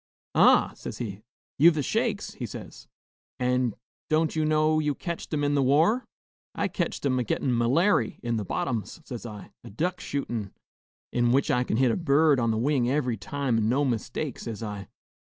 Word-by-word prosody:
'Ah!' - - +5
says - - -7
he, 105 -4 -5 0.4
'you've 165 +2 +7
the 150 - 0
shakes?' 220 - -1
he 125 - -5
says; - - -10 0.5
'an' 125 -2 +1 0.3
don't 155 0 +2
you 155 - +1
know 155 0 +3
you 150 -2 0
ketched 170 -2 -5
'em 150 -2 0
in 145 0 +1
the 140 - +3
war?' 160 - +3 0.5
'I - - 0
ketched - - -3
'em 130 -2 +2
a - - +1
gettin' 125 +3 0
m'lairy 125 - +2
in 120 -1 -1
the 105 - -2
bottoms,' 110 - -3
says 120 -2 -7
I, 105 -4 -10
'a - - -10
duck 175 - -2
shootin', 120 -8 -4 0.6
in 120 -1 +2
which 135 +2 +2
I 125 - +2
kin 110 - -1
hit 130 -1 +4
a - - 0
bird 150 -3 +3
on 115 -1 +1
the 110 - +1
wing 125 0 +1
every 130 -4 0
time 125 +4 -2
an' 110 0 +1
no 140 +4 +2
mistake,' 125 +3 -3
says 115 -1 -6
I. 105 -3 -6
130 Hz, 190 wpm, -27 LUFS, 115-155 Hz, 0.6 s, you've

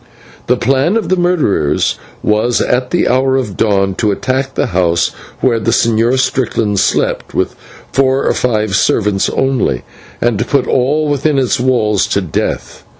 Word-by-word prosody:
The 125 - +2
plan 135 - +1
of 200 -7 -3
the 185 - +3
murderers 175 - +1 0.2
was 110 +3 +1
at 125 0 0
the 175 - +1
hour 130 +1 +2
of 110 -8 -3
dawn 100 -3 +1
to 105 - +2
attack 130 +5 -2
the - - +1
house 85 -2 +2 0.3
where 120 -3 +2
the 115 - -1
Señor 115 +2 +2
Strickland 115 -6 0
slept - - -1
with - - 0 0.4
four 135 0 +1
or - - +2
five 110 -5 0
servants 105 -1 +1
only, 130 - 0 0.4
and 120 -3 0
to 115 - 0
put 140 -1 +1
all 145 +4 +1
within 145 0 0
its 130 -3 +1
walls 110 -6 +1
to 100 - 0
death. 90 -5 -4
125 Hz, 160 wpm, -14 LUFS, 105-135 Hz, 0.4 s, the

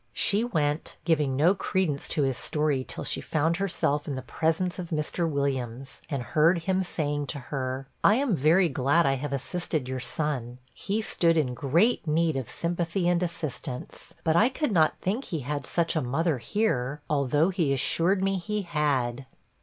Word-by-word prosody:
She 205 +3 +2
went, 155 -9 -1
giving 150 -5 +2
no 160 +7 +4
credence 185 -7 -1
to 150 - 0
his 135 -1 +1
story 150 -2 0
till - - -6
she - - -2
found 160 +2 0
herself 150 -6 0
in 140 - -2
the 130 - -5
presence 165 +7 -1
of 175 -2 -5
Mr. 160 +2 -1
Williams, 135 -3 -3
and 140 -5 -2
heard 165 +6 +3
him 190 +1 +1
saying 145 -5 -2
to 145 - -3
her, 130 0 -4 0.2
'I 210 - +6
am 260 -5 +1
very 165 +5 +4
glad 140 +4 +2
I 135 - +3
have 140 +1 -3
assisted 150 0 -2
your 130 0 -3
son; 130 -4 -2 0.2
he 215 +3 -2
stood 165 -5 +2
in 135 -5 +1
great 165 - +2
need 160 0 +2
of 130 -4 -3
sympathy 170 +1 -1
and 175 0 +2
assistance; 155 -6 -5
but 160 0 +2
I 220 +8 +5
could 265 0 -1
not 160 -5 +3
think 215 +9 -1
he 160 -4 -3
had 145 +2 -4
such 170 -1 0
a 160 - +2
mother 140 +3 0
here, 145 - -1
although 145 +3 +2
he 175 -7 0
assured 175 +8 +2
me 195 0 +1
he 210 +3 -2
had.' 140 -6 -1
155 Hz, 180 wpm, -27 LUFS, 135-175 Hz, 0.2 s, I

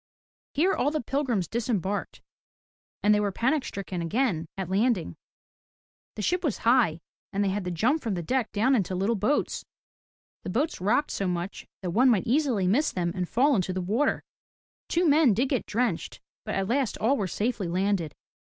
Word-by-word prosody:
Here, 360 +7 +3
all 285 - +1
the 310 +1 -1
pilgrims 245 - -1
disembarked, 205 -4 -2 0.8
and 210 - +5
they 210 - +3
were 205 -1 0
panic 260 +8 +1
stricken 190 -2 -5
again 170 -3 0
at 190 -2 -3
landing. 190 - +1 1.0
The 210 - -4
ship 360 - 0
was 290 - 0
high, 230 -10 +3 0.3
and 200 0 0
they 200 - +1
had 195 0 -2
to - - -2
jump 235 - +1
from 220 -5 -2
the 175 - -3
deck 255 +5 -1
down 230 +6 +2
into 195 -6 +1
little 195 +5 +1
boats. 220 +9 0 0.8
The - - -6
boats 270 - -1
rocked 240 +10 +1
so 195 - -1
much 180 +2 -4 0.2
that 180 - -2
one 250 +8 +4
might 215 -7 +2
easily 250 -6 +1
miss 255 +12 +2
them 175 -2 -1
and 180 -2 -3
fall 275 +4 +3
into 185 -2 0
the 185 - -2
water. 220 +11 0 0.6
Two 345 +1 +2
men 290 -7 +5
did 255 +5 +1
get 260 -5 -1
drenched, 245 +3 -1 0.3
but - - -3
at 195 -1 -1
last 255 +1 0
all 245 +6 +2
were 205 -8 -1
safely 210 0 -2
landed. 180 -3 0
215 Hz, 185 wpm, -27 LUFS, 185-260 Hz, 1.0 s, and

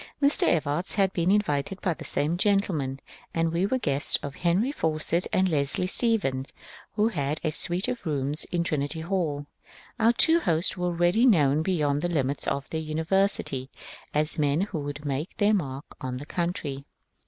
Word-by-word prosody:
Mr. 280 +1 +4
Evarts 155 +2 0
had 195 -2 +2
been 170 0 0
invited 195 -3 0
by 180 - 0
the - - -10
same 155 +4 0
gentlemen, 175 -9 0 0.4
and 165 0 0
we 180 +4 +1
were 260 - 0
guests 145 - +3
of 140 - -5
Henry 180 - +1
Fawcett 160 - 0
and 190 0 +2
Leslie 150 +1 +1
Stephen, 185 - +1 0.5
who 215 +1 +2
had 150 -6 -2
a 155 - 0
suite 175 +6 +2
of 250 -1 -4
rooms 145 -2 0
in 175 -1 -1
Trinity 155 -1 -2
HalL 160 -5 -2 0.5
Our 230 +1 +4
two 325 +7 +4
hosts 165 - +1
were 180 -1 -2
already 175 +8 +3
known 150 - +4
beyond 150 -5 0
the 175 - -1
limits 140 -4 -1
of 140 -1 -2
their 160 - -2
university 160 -4 0 0.4
as 155 +1 +1
men 145 +2 +2
who 195 -5 -3
would 145 +1 -6
make 145 +4 -3
their 210 0 +3
m^rk 140 -8 -2 0.2
on 125 -1 -4
the 140 - -8
country. 150 -5 -3
165 Hz, 175 wpm, -26 LUFS, 145-190 Hz, 0.5 s, Mr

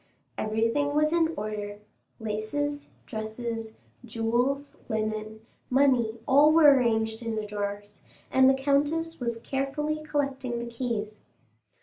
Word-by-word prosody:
Everything 230 +7 0
was 305 +1 +3
in 330 -1 +3
order,—laces, 215 +6 -5 0.2
dresses, 225 0 -5 0.3
jewels, 240 +5 -1
linen, 215 0 -3 0.3
money, 250 -4 +3
all 290 +3 +6
were 310 -3 +8
arranged 225 -3 +1
in 230 -1 -3
the 215 -1 -2
drawers, 205 0 -5 0.3
and 265 0 +6
the 270 - +4
countess 295 +4 0
was 235 -2 -2
carefully 280 +5 -2
collecting 275 -5 -2
the 235 - -4
keys. 230 -3 -3
235 Hz, 110 wpm, -27 LUFS, 220-285 Hz, 0.3 s, were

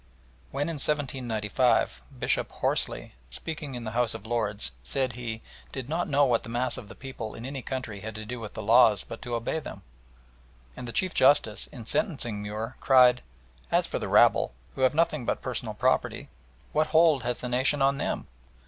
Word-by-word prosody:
When 140 +1 -2
in 165 -2 -3
1795 125 -5 0 0.2
Bishop - - 0
Horsley, - - 0 0.2
speaking 145 - -5
in 120 - -5
the 110 - -4
House 115 -1 0
of 110 -1 -8
Lords, 105 - 0
said 125 - -1
he 115 -2 -5 0.3
"did 130 -1 -6
not 170 +2 -1
know 145 0 +4
what 120 -3 +2
the - - -10
mass 120 +2 +1
of 105 - -8
the - - -10
people 130 -5 -7
in 115 - -8
any 135 0 -5
country 120 -5 -5
had 110 +1 -7
to 110 0 -6
do 120 +2 -5
with 110 -2 -8
the 110 - -5
laws 110 -2 +5
but 115 - -9
to 120 -2 -3
obey 115 +7 -2
them"; - - -9 0.9
and 125 - -7
the - - -4
Chief 185 +7 0
Justice, 130 -6 +3
in 115 - -10
sentencing 135 - 0
Muir, 105 +2 -5
cried, 125 -2 +6 0.5
"As - - +3
for - - -3
the - - -3
rabble, - - +4 0.2
who - - -6
have 130 +2 +3
nothing 155 -4 +2
but - - -2
personal - - -4
property, - - 0 0.4
what 155 +1 +2
hold 160 -3 +5
has 120 0 -2
the 125 - -3
nation 130 +3 +2
on 140 0 +3
them?" - - -2
125 Hz, 195 wpm, -27 LUFS, 110-135 Hz, 0.9 s, cried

